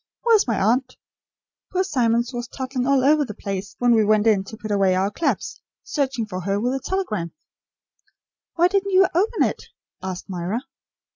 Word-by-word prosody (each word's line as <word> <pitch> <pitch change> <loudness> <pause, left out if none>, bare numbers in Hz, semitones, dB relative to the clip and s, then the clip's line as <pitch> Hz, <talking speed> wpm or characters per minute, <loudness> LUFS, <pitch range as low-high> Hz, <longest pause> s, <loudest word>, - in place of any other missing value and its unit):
Where 470 -2 +5
is 420 - +2
my 225 - 0
aunt? 240 +6 +1 0.7
Poor 370 0 +1
Simmons 240 -7 +1
was 240 0 -4
toddling 255 -1 -3
all 275 -2 +3
over 300 +1 +4
the 210 -7 -7
place 195 -1 -5
when 245 -1 +3
we 220 -1 +4
went 210 0 +3
in 210 -4 +3
to 220 +2 -9
put 215 0 -6
away 195 -2 +3
our 190 +2 +1
clubs, 330 - -2 0.2
searching 270 -6 -1
for 185 -3 -5
her 195 +2 -1
with 245 +4 0
a 270 - -1
telegram." 215 - -2 1.2
"Why 345 +1 +5
didn't 395 +1 0
you 380 +1 +7
open 415 +7 +2
it?" - - -2 0.4
asked 185 -1 -5
Myra. 190 +5 -3
235 Hz, 185 wpm, -22 LUFS, 200-290 Hz, 1.2 s, you